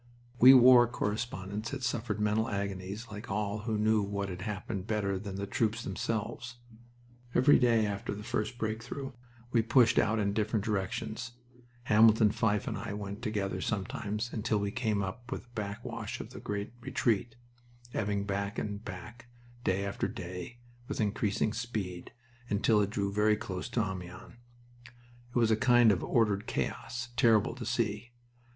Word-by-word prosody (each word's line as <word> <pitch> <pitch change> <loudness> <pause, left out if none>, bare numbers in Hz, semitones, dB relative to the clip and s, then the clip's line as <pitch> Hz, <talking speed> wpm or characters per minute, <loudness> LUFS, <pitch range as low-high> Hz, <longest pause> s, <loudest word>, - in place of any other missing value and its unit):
We 130 +2 +10
war 125 -1 +8
correspondents 105 -2 -3
had 135 -2 -5
suffered 115 -3 -1
mental 105 +2 +1
agonies 100 +2 -4
like 105 +1 -8
all 105 +1 -1
who 110 0 -2
knew 110 0 +3
what 100 0 -2
had 90 0 -6
happened 100 -1 -4
better 100 -3 0
than 100 -1 -6
the 100 +1 -3
troops 115 +2 0
themselves. 115 +4 -3 0.8
Every 145 +3 +6
day 115 -3 +4
after 100 0 -3
the 105 - -8
first 110 +3 -2
break 110 0 -2
through 135 +3 -6 0.4
we 115 - +4
pushed 115 +1 +4
out 105 +1 +2
in 100 -2 +1
different 105 0 0
directions 110 +4 -3 0.5
Hamilton 110 -1 +6
Fyfe 105 -2 +1
and - - -2
I - - -5
went 100 +1 -6
together 105 -4 -2
sometimes 105 +2 -3
until 110 0 0
we 100 0 -1
came 105 -3 0
up 120 +6 -6
with - - -4
the 125 - -25
backwash 105 +1 -5
of - - -8
the - - -8
great 100 +2 -4
retreat, 115 -1 0 0.6
ebbing 100 -1 0
back 100 +1 -2
and 105 0 -4
back, 115 +6 -9 0.4
day 95 -1 +1
after 100 - -2
day, 90 +5 -7 0.3
with - - -4
increasing 105 0 0
speed, 105 -7 -4 0.4
until 105 +1 +3
it 100 - 0
drew 100 -2 -2
very 105 +1 +3
close 105 -2 -5
to 120 -2 +1
Amiens. 90 -2 -8 1.0
It - - -20
was 115 -2 +3
a - - +5
kind 120 -1 +5
of 95 - 0
ordered 105 -3 +1
chaos, 120 0 -3
terrible 115 -3 +4
to 120 -2 -7
see. 120 0 -1
105 Hz, 160 wpm, -31 LUFS, 100-115 Hz, 1.0 s, We